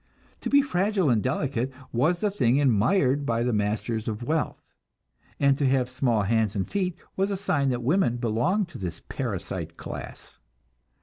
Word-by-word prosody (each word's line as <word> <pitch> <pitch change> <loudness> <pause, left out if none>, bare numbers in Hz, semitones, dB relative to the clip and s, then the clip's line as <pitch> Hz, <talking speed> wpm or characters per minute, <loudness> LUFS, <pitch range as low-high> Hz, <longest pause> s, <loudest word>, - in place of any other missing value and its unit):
To - - -4
be 280 0 +5
fragile 195 - +1
and 110 -3 +3
delicate 130 0 -1 0.2
was 155 +9 +2
the 210 - +1
thing 130 - +2
admired 140 - +3
by 115 -3 0
the 125 0 0
masters 110 +2 -1
of 110 +1 -3
wealth, 155 +4 -1 0.8
and 140 -1 +4
to 140 - +3
have 130 -1 +1
small 120 -5 +1
hands 110 0 +1
and 95 -2 -1
feet 185 -4 -1 0.2
was 195 +1 +1
a 200 - -1
sign 145 -8 +1
that 120 -1 -1
women 140 -3 +2
belonged 120 - +1
to 150 - -10
this 90 -4 -4
parasite - - -5
class. - - -8
130 Hz, 170 wpm, -26 LUFS, 115-175 Hz, 0.8 s, be